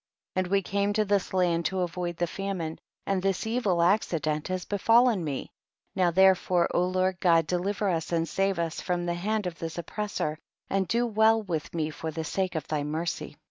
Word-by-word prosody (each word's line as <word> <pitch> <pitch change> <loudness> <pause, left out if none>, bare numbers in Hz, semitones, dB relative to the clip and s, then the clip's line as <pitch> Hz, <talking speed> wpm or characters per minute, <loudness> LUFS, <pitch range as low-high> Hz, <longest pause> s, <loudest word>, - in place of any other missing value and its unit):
18. - - +2
And 180 - -8
we 200 0 +4
came 200 +2 0
to 215 0 +2
this 200 -2 0
land 175 -3 +2
ta 190 - -4
avoid 175 -1 -2
the 175 - +1
famine, 175 -3 -4 0.3
and 195 -2 0
this 195 +2 0
evil 220 -5 +1
acci 175 0 +2
dent 155 0 -2
has 185 -1 -3
befallen 225 0 +3
me; 145 -4 -4 0.4
now 185 -2 +3
therefore 185 -1 +4
O 180 +1 +2
Lord 185 0 0
God 165 -3 +4
deliver 190 +5 -1
us 165 -4 -1
and 165 -1 +1
save 195 +1 0
us 165 -1 -2
from 175 -1 -1
the 175 - 0
hand 205 +4 -1
of 175 -2 -5
this 165 0 -5
oppressor, 170 -4 -3 0.3
and 195 -1 +1
do 235 +6 +1
well 220 0 +3
with 165 -6 -3
me 155 -1 -1
for 160 +1 -5
the 160 +1 -4
sake 185 +3 -2
of 160 - -3
thy 150 -2 -1
mercy. 155 0 -3
180 Hz, 205 wpm, -28 LUFS, 165-195 Hz, 0.4 s, we